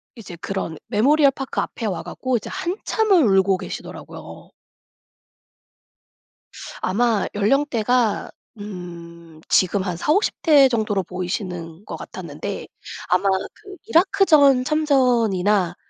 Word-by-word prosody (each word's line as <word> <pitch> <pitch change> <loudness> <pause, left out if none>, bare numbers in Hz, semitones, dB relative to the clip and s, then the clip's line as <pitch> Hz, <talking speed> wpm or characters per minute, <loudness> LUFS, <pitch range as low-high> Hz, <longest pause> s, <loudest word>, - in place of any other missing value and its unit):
이제 195 -7 -10
그런 195 -5 -4
메모리얼 280 +6 +4
파크 270 0 -5
앞에 230 - -5
와 175 -5 -3
갖고 250 +8 -2
이제 - - -8
한참을 380 - +1
울고 190 0 +3
계시더라고요. - - -9 2.3
아마 220 +2 +1
연령대가 240 0 +1 0.3
음 170 -5 -10
지금 190 +1 +3
한 180 -3 -3
40-50 315 - +1
대 285 -5 +6
정도로 215 -5 0
보이시는 180 -1 -5
것 - - -7
같았는데 - - -7 0.4
아마 185 +2 +2
그 385 - -4
이라크전 320 -7 +4
참전이나 230 - +2
215 Hz, 235 characters per minute, -21 LUFS, 185-280 Hz, 2.3 s, 대